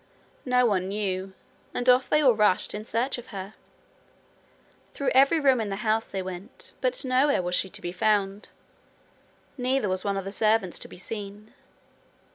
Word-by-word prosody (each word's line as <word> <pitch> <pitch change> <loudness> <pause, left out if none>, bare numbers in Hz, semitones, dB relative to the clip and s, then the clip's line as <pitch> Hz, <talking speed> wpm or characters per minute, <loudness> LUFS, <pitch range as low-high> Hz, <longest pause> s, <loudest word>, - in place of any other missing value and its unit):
No 250 0 +4
one 190 -5 +1
knew, 195 -1 -3 0.4
and 245 - -2
off 250 +1 +5
they 300 - +4
all 255 -3 +6
rushed 210 -4 +2
in 210 - -5
search 240 +4 -1
of 240 - -12
her. 195 0 -7 1.4
Through 280 - -1
every 275 +5 +5
room 265 -5 +3
in 210 - -3
the 195 - -2
house 220 +1 +1
they 190 -1 -3
went, 185 - -9
but - - 0
nowhere 260 -3 +2
was 175 0 -3
she 190 - +1
to - - -8
be 175 - -3
found. 200 +1 0 1.1
Neither 255 -4 +1
was 185 0 -2
one 200 -1 -1
of 195 - -4
the 195 - -5
servants 215 -3 +1
to - - -7
be - - -13
seen. 205 +2 -8
215 Hz, 175 wpm, -26 LUFS, 195-250 Hz, 1.4 s, all